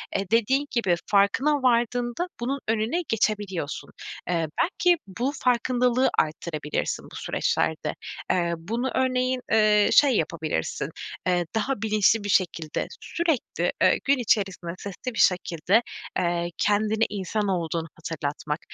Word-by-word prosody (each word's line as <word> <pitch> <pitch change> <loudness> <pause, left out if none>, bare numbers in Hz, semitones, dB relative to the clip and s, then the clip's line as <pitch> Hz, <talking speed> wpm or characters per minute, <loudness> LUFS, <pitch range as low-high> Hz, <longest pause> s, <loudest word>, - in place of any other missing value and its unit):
eee, 195 - 0
dediğin 250 +5 +3
gibi 195 -8 +2
farkına 200 +9 +3
vardığında 240 +5 +1
bunun 265 +4 -2
önüne 225 +9 0
geçebiliyorsun. 205 -8 -1 0.4
Eee, 165 -2 +1
belki 355 -1 +3
bu 240 +8 -2
farkındalığı 250 +1 +2
arttırabilirsin 155 -1 -2
bu - - -11
süreçlerde. - - -1 0.4
Eee, 170 -1 +1
bunu 230 +10 -3
örneğin, 255 0 +1
eee, 210 -1 +5
şey 280 -4 +6
yapabilirsin, 155 - -2 0.4
eee, 175 -1 +2
daha 240 +1 -1
bilinçli 215 0 +3
bir 205 - -4
şekilde, 165 -5 0
sürekli, 330 -7 -1
eee, - - +5
gün 275 +1 +3
içerisinde 195 -7 0
sesli 205 +6 -6
bir - - -5
şekilde, 180 +3 +3 0.4
eee, 175 -1 0
kendine 215 +2 +2
insan 205 +1 -2
olduğunu 165 -3 -1
hatırlatmak. 150 -1 -4
210 Hz, 120 wpm, -25 LUFS, 175-245 Hz, 0.4 s, şey